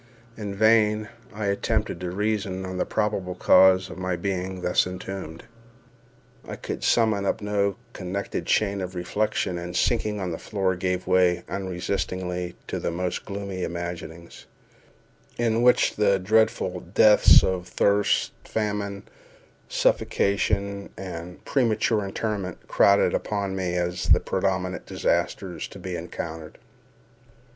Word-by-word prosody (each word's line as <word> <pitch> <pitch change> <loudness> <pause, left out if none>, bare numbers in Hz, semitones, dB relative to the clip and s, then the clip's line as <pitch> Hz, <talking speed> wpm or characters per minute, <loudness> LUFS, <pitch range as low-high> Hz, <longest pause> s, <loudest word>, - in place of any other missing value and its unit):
In 100 -2 -5
vain 110 0 +3 0.2
I 105 -1 -4
attempted 100 -1 -1
to 90 0 -4
reason 100 -1 -2
on 95 0 -5
the - - 0
probable 100 -4 -1
cause 95 0 +5
of 95 - -9
my 90 -1 -1
being 95 0 -3
thus 90 0 +2
entombed. 90 -3 -7 1.0
I - - -5
could - - -6
summon 110 -4 +3
up 100 - 0
no 100 -1 0 0.2
connected 95 +2 -4
chain 100 -2 +1
of 90 0 -5
reflection, 90 0 -1
and, 85 0 -6
sinking 105 -3 +1
on 95 -2 -3
the 80 - -5
floor, 95 -3 -1
gave 90 0 -2
way, 90 -1 +3
unresistingly, 90 -1 -3
to - - -4
the - - -2
most 90 +1 -3
gloomy 100 -2 -5
imaginings, 85 0 -6 0.9
in 115 -1 +1
which 125 0 +4
the 100 -2 +3
dreadful 95 -2 +1
deaths 105 +4 +6
of 90 -1 -1
thirst, 100 0 +2
famine, 105 -2 -3 0.7
suffocation, 100 0 0
and 90 -2 -8
premature 110 -4 +1
interment 100 -2 -4
crowded 100 0 +4
upon 100 -2 -2
me 90 -2 -2
as 90 +1 -2
the - - +7
prominent 95 -1 -2
disasters - - -1
to - - -12
be 95 -1 -5
encountered. 80 -2 -6
95 Hz, 130 wpm, -25 LUFS, 90-105 Hz, 1.0 s, the